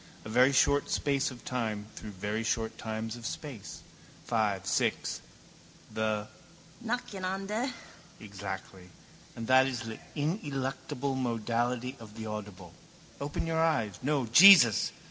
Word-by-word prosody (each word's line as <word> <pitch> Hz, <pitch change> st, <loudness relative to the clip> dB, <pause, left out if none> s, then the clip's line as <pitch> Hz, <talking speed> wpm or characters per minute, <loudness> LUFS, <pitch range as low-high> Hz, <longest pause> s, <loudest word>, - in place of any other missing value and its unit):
A -, -, -6 dB
very 125 Hz, +4 st, +5 dB
short 140 Hz, +1 st, +3 dB
space 140 Hz, -1 st, +1 dB
of 125 Hz, -3 st, -12 dB
time 110 Hz, -5 st, -2 dB
through 110 Hz, -, -8 dB
very 105 Hz, +3 st, -3 dB
short 110 Hz, 0 st, -1 dB
times 110 Hz, 0 st, -4 dB
of 120 Hz, -, -11 dB
space. 130 Hz, -4 st, -7 dB, 0.4 s
Five, 105 Hz, -5 st, 0 dB
six: -, -, 0 dB, 0.7 s
the 110 Hz, -1 st, -1 dB, 0.6 s
nacheinander. 210 Hz, 0 st, -2 dB, 0.5 s
Exactly: 95 Hz, -2 st, -8 dB, 0.5 s
and 115 Hz, -, -5 dB
that 130 Hz, +2 st, +5 dB
is 125 Hz, -3 st, -3 dB
the 110 Hz, -1 st, -7 dB, 0.2 s
ineluctable 140 Hz, -, -2 dB
modality 120 Hz, +1 st, -1 dB
of 110 Hz, -2 st, -12 dB
the 110 Hz, -, -5 dB
audible. 100 Hz, -5 st, -7 dB, 0.5 s
Open 145 Hz, +3 st, -3 dB
your 160 Hz, 0 st, 0 dB
eyes. 115 Hz, -, +1 dB
No. 140 Hz, -1 st, +1 dB
Jesus! 120 Hz, -, +8 dB
120 Hz, 125 wpm, -30 LUFS, 110-140 Hz, 0.7 s, Jesus